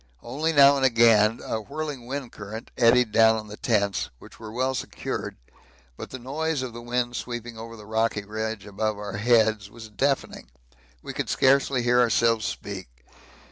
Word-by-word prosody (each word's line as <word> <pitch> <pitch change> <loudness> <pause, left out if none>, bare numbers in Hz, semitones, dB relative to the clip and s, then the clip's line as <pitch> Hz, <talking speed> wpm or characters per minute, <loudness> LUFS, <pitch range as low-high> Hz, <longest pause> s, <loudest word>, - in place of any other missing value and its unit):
Only 150 +7 -1
now 140 -2 +7
and 135 - -1
again 115 -3 +4
a 110 - -2
whirling 140 +2 -6
wind 135 -2 -5
current 105 +2 -9
eddied 120 -1 +4
down 110 0 +5
on 110 -1 -7
the 105 - -7
tents, 105 -6 0
which - - -16
were 110 -1 -8
well 130 +3 0
secured, - - -5 0.6
but - - -8
the 130 - -7
noise 145 +3 -2
of 125 -3 -6
the 120 - -8
wind 120 0 -2
sweeping 120 0 -5
over 115 +1 -9
the 105 -2 -12
rocky 110 -1 -1
ridge 110 -1 -4
above 105 +1 -2
our 100 -1 -5
heads 110 -2 +2
was 110 0 -11
deafening; 135 - -2 0.5
we - - -6
could - - -3
scarcely 135 -1 +3
hear 120 +1 +3
ourselves 115 -2 +3
speak. - - -6
115 Hz, 175 wpm, -25 LUFS, 110-130 Hz, 0.6 s, now